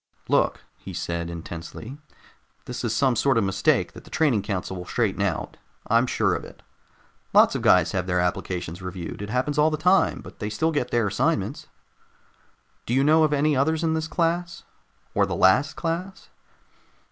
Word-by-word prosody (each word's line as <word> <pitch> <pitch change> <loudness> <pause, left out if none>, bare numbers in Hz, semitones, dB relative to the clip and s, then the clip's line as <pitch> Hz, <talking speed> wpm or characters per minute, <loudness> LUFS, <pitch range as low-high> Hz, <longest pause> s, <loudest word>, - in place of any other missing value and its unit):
"Look," - - +1 0.2
he 95 - -9
said 85 0 -3
intensely, 85 +8 -8 0.7
"this 125 0 -6
is 120 - 0
some 130 -1 +2
sort 135 +1 +2
of 115 - +3
mistake 95 0 +1
that - - -12
the - - -16
training 140 -10 +2
council 95 -2 -4
will 90 -1 -7
straighten 110 -5 0
out. 95 -6 -2 0.3
I'm 115 +3 +3
sure - - +1
of - - -3
it. - - -13 0.7
Lots - - +6
of - - -2
guys 90 -2 +4
have 90 -2 -2
their 90 0 +1
applications 90 -1 -2
reviewed. 90 0 -6
It 105 - -5
happens 130 +5 -1
all 150 +1 +5
the 155 - -2
time, 180 +5 +3
but - - -13
they 105 - -3
still 160 +10 0
get 135 -5 -1
their 120 -2 +1
assignments." 100 -1 -1 1.2
"Do 120 - 0
you 135 - +3
know 155 +2 +5
of 155 - +2
any 150 +1 +2
others 160 +5 +1
in 160 -1 +1
this 160 0 -1
class? 170 +1 -1 0.5
Or - - +2
the - - -3
last 130 +12 +3
class?" 175 +3 -4
120 Hz, 180 wpm, -24 LUFS, 95-155 Hz, 1.2 s, Lots